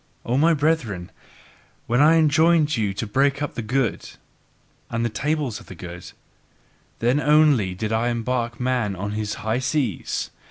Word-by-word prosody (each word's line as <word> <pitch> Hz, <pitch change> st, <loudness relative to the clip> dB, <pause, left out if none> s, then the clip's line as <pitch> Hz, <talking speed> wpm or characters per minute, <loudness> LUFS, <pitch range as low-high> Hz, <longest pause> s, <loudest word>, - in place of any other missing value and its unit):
O 120 Hz, -, 0 dB
my 160 Hz, +4 st, +4 dB
brethren, 135 Hz, -, -1 dB, 0.7 s
when 120 Hz, +3 st, +2 dB
I 155 Hz, +2 st, +6 dB
enjoined 155 Hz, 0 st, +3 dB
you 105 Hz, -4 st, 0 dB
to 100 Hz, +4 st, -4 dB
break 135 Hz, +6 st, +1 dB
up 145 Hz, -1 st, -3 dB
the -, -, -4 dB
good, 125 Hz, +1 st, -1 dB, 0.8 s
and 115 Hz, 0 st, -1 dB
the -, -, 0 dB
tables 145 Hz, +1 st, -2 dB
of -, -, -16 dB
the 95 Hz, -, -10 dB
good, 90 Hz, 0 st, -9 dB, 0.9 s
then 120 Hz, +5 st, +1 dB
only 145 Hz, -10 st, +3 dB
did 110 Hz, +3 st, -3 dB
I 115 Hz, +2 st, +1 dB
embark 120 Hz, 0 st, -2 dB
man 125 Hz, -5 st, 0 dB
on 100 Hz, +3 st, -4 dB
his 105 Hz, 0 st, -3 dB
high 110 Hz, +3 st, +1 dB
seas. 130 Hz, -, -2 dB
120 Hz, 160 wpm, -23 LUFS, 110-145 Hz, 0.9 s, I